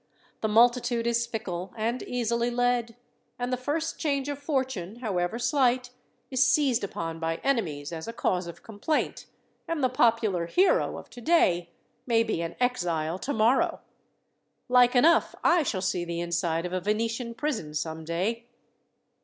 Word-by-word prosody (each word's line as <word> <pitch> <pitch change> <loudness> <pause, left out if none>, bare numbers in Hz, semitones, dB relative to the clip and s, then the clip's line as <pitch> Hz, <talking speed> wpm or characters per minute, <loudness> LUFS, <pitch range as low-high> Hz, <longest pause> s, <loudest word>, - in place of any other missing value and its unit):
The 220 - +1
multitude 240 +1 +3
is 235 0 +1
fickle 195 -4 -5
and 230 +3 -1
easily 235 -1 -1
led; 245 -1 0 0.4
and 245 +1 -2
the - - +4
first 295 +6 -3
change 280 -3 -1
of 285 -1 -4
fortune, 260 - -2
however 205 -4 -2
slight, 250 -1 +1 0.4
is 260 0 +4
seized 260 -2 +3
upon 165 -4 -4
by 165 0 -1
enemies 170 - -1
as 160 +2 -6
a - - -3
cause 180 -5 -1
of 170 - -10
complaint, 225 +8 -2 0.4
and 330 -4 -2
the 255 - +4
popular 225 -8 +2
hero 385 - +2
of - - -11
today 225 - +2 0.4
may 230 -2 +4
be 220 -7 -2
an 165 0 -4
exile 175 -9 0
tomorrow. 240 0 +2 0.9
Like 250 0 +5
enough 315 +7 +4
I 345 0 +5
shall 195 -10 -2
see 180 -2 0
the 170 0 -4
inside 170 -1 -1
of 180 - -4
a 185 - -1
Venetian 230 +4 -1
prison 230 - -3
some 160 +1 -3
day." 195 +9 -2
230 Hz, 155 wpm, -27 LUFS, 180-250 Hz, 0.9 s, Like